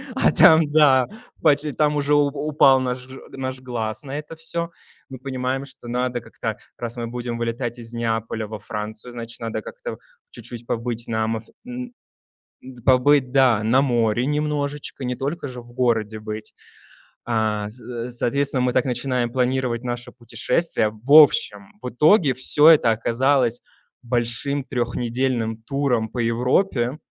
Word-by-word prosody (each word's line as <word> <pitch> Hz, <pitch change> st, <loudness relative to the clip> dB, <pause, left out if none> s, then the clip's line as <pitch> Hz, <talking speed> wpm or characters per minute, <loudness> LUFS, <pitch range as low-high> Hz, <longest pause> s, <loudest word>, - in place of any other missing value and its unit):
а -, -, +3 dB
там, 160 Hz, -2 st, +6 dB
да, 135 Hz, -5 st, +5 dB, 0.3 s
пачи 145 Hz, +1 st, +3 dB
там 150 Hz, +1 st, +1 dB
уже 145 Hz, 0 st, +1 dB
уже -, -, +6 dB
у 145 Hz, -1 st, +4 dB
у 145 Hz, +1 st, -5 dB
упал 135 Hz, -3 st, +5 dB
наш 125 Hz, 0 st, -3 dB, 0.2 s
наш 130 Hz, -1 st, -5 dB
глаз 115 Hz, -3 st, -4 dB
на 140 Hz, +1 st, -5 dB
это 155 Hz, +2 st, -9 dB
всё. 170 Hz, +1 st, -4 dB, 0.4 s
Мы 130 Hz, -, -8 dB
понимаем, 130 Hz, 0 st, -3 dB
что 130 Hz, -3 st, -14 dB
надо 125 Hz, 0 st, -1 dB
как-то -, -, -5 dB, 0.2 s
раз 120 Hz, 0 st, -6 dB
мы 115 Hz, -1 st, -3 dB
будем 120 Hz, 0 st, -4 dB
вылетать 120 Hz, +1 st, -3 dB
из 115 Hz, 0 st, -11 dB
Неаполя 115 Hz, -1 st, -2 dB
во 110 Hz, 0 st, -7 dB
Францию, 105 Hz, +3 st, -6 dB
значит, 115 Hz, 0 st, -8 dB
надо 115 Hz, -1 st, -4 dB
как-то -, -, -7 dB, 0.3 s
чуть-чуть 120 Hz, -1 st, -10 dB
побыть 115 Hz, 0 st, -3 dB
на 110 Hz, -1 st, 0 dB
амаф 110 Hz, 0 st, -2 dB, 0.2 s
н 250 Hz, 0 st, -6 dB, 0.7 s
н 125 Hz, -2 st, -12 dB
побыть, 130 Hz, 0 st, +4 dB
да, 125 Hz, -6 st, +4 dB
на 125 Hz, +5 st, +3 dB
море 120 Hz, -2 st, +1 dB
немножечко, 145 Hz, -2 st, -2 dB
не 125 Hz, 0 st, -1 dB
только 145 Hz, +4 st, -4 dB
же 125 Hz, -1 st, -8 dB
в 120 Hz, 0 st, -16 dB
городе 115 Hz, -3 st, 0 dB
быть. 110 Hz, 0 st, -7 dB, 0.7 s
А, 110 Hz, -3 st, 0 dB
з -, -, -13 dB, 0.4 s
за -, -, -9 dB
соответственно, 135 Hz, +2 st, 0 dB
мы 125 Hz, -1 st, +1 dB
так 130 Hz, -, +2 dB
начинаем 125 Hz, -1 st, -1 dB
планировать 125 Hz, -1 st, 0 dB
наше 120 Hz, 0 st, -5 dB
путешествие. 120 Hz, 0 st, -1 dB
В 140 Hz, -, -4 dB
общем, 105 Hz, -9 st, +5 dB
в 125 Hz, -, -4 dB
итоге 150 Hz, -, +4 dB
всё 145 Hz, +5 st, +5 dB
это 145 Hz, -8 st, +6 dB
оказалось 120 Hz, +2 st, +1 dB, 0.4 s
большим 120 Hz, +3 st, -1 dB
трехнедельным 120 Hz, -2 st, -1 dB
туром 135 Hz, -4 st, 0 dB
по 125 Hz, -, -6 dB
Европе. 125 Hz, +3 st, +1 dB
125 Hz, 155 wpm, -22 LUFS, 115-140 Hz, 0.7 s, там